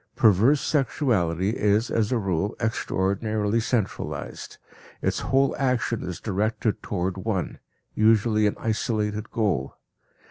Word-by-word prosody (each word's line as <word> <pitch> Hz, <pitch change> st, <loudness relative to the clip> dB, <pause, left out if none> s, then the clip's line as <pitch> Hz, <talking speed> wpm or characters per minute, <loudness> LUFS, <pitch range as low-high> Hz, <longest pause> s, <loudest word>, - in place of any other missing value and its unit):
Perverse 115 Hz, +7 st, +4 dB
sexuality 110 Hz, -, +1 dB
is 105 Hz, 0 st, +1 dB
as 110 Hz, 0 st, +1 dB
a 125 Hz, -, +2 dB
rule 100 Hz, -1 st, -1 dB
extraordinarily 110 Hz, 0 st, 0 dB
centralized, 110 Hz, -3 st, -3 dB, 0.4 s
its -, -, -1 dB
whole 135 Hz, +1 st, +2 dB
action 120 Hz, -4 st, 0 dB
is 90 Hz, -1 st, -5 dB
directed 110 Hz, +1 st, -1 dB
toward 95 Hz, -1 st, -2 dB
one, 95 Hz, -2 st, -3 dB, 0.3 s
usually 110 Hz, 0 st, +3 dB
an 105 Hz, -, -1 dB
isolated, 110 Hz, -1 st, -1 dB
goal. 100 Hz, -, -1 dB
110 Hz, 110 wpm, -25 LUFS, 100-115 Hz, 0.4 s, Perverse